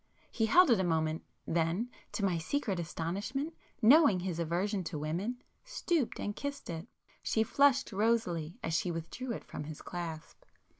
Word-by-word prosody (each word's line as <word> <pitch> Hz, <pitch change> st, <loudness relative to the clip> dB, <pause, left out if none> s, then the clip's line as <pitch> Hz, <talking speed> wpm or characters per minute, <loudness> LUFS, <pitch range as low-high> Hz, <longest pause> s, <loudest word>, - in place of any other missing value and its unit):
He 225 Hz, -1 st, +1 dB
held 355 Hz, +5 st, +6 dB
it 225 Hz, -, +5 dB
a -, -, +2 dB
moment,—then, 165 Hz, +4 st, -1 dB, 0.2 s
to 205 Hz, -, 0 dB
my 175 Hz, -4 st, +1 dB
secret 200 Hz, -, -1 dB
astonishment, 195 Hz, -, -3 dB, 0.3 s
knowing 240 Hz, -, +7 dB
his 175 Hz, -2 st, -3 dB
aversion 180 Hz, +4 st, 0 dB
to 160 Hz, -1 st, -4 dB
women, 180 Hz, +12 st, -3 dB, 0.2 s
stooped 345 Hz, -, -1 dB
and 205 Hz, -, -3 dB
kissed 280 Hz, -7 st, -5 dB
it. 165 Hz, +5 st, -6 dB, 0.3 s
She 220 Hz, -, +2 dB
flushed 275 Hz, +3 st, +3 dB
rosily 190 Hz, -7 st, 0 dB
as 165 Hz, -, -1 dB
she 175 Hz, +2 st, +1 dB
withdrew 170 Hz, +10 st, -4 dB
it -, -, -4 dB
from 150 Hz, -, -7 dB
his 155 Hz, 0 st, -7 dB
clasp. 165 Hz, -3 st, -6 dB
190 Hz, 155 wpm, -32 LUFS, 165-240 Hz, 0.3 s, knowing